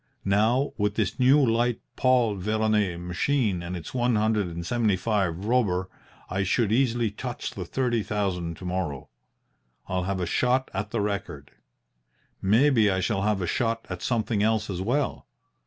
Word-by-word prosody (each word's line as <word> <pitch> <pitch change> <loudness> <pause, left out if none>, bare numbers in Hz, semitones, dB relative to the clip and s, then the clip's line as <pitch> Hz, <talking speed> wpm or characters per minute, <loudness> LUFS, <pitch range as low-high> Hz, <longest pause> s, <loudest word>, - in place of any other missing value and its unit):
Now, 110 +8 +2
with 105 0 0
this 105 -1 -1
new 130 +3 +6
light 120 0 +1 0.2
Paul 125 -4 +3
Veroner 105 -2 0
machine 95 +3 0
and 90 +1 -5
its 80 - -9
one 120 -2 +1
hundred 105 -2 +1
and 85 0 -6
seventy 115 -2 +1
five 95 -3 -1
Robur, 100 -6 +1 0.4
I 95 +1 -2
should 105 +3 +1
easily 120 -2 +2
touch 120 +3 -5
the 90 - -6
thirty 120 +3 0
thousand 90 -5 -2
to 90 - -9
morrow. 90 -7 -3 0.8
I'll 90 0 -1
have 95 0 -2
a 90 - -1
shot 125 +8 +1
at 100 +2 -3
the 115 -1 -1
record. 95 -8 -4 0.9
Maybe 115 +2 +4
I 95 -1 +1
shall 95 +1 0
have 105 -2 0
a - - 0
shot 115 +4 -1
at 90 - -5
something 115 -3 0
else 110 -1 +1
as 90 -1 -3
well. 130 +8 -1
105 Hz, 165 wpm, -26 LUFS, 95-120 Hz, 0.9 s, new